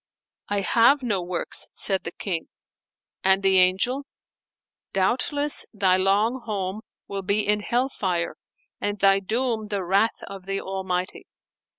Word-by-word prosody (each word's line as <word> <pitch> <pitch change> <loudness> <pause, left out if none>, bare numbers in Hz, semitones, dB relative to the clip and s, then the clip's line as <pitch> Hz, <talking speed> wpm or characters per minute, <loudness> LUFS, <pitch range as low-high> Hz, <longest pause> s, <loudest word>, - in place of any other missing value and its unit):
"I 205 -1 0
have 235 +8 +4
no 205 -6 0
works," 175 0 0
said 195 -2 +1
the 165 - -3
King; 175 -4 -4 0.8
and 190 +1 +3
the 190 -1 +5
Angel, 220 +10 +2 0.9
"Doubtless 260 +9 +2
thy 190 -2 +3
long 205 +7 +1
home 200 -1 -3 0.3
will 200 -1 -4
be 200 +2 0
in 210 0 +2
hell 245 +5 0
fire 180 -9 -2 0.4
and 205 0 -2
thy 195 0 +4
doom 220 +2 -2
the 200 -2 -3
wrath 195 +5 +2
of 195 -1 -10
the 195 0 -2
Almighty." 190 -1 -4
195 Hz, 135 wpm, -24 LUFS, 190-220 Hz, 0.9 s, the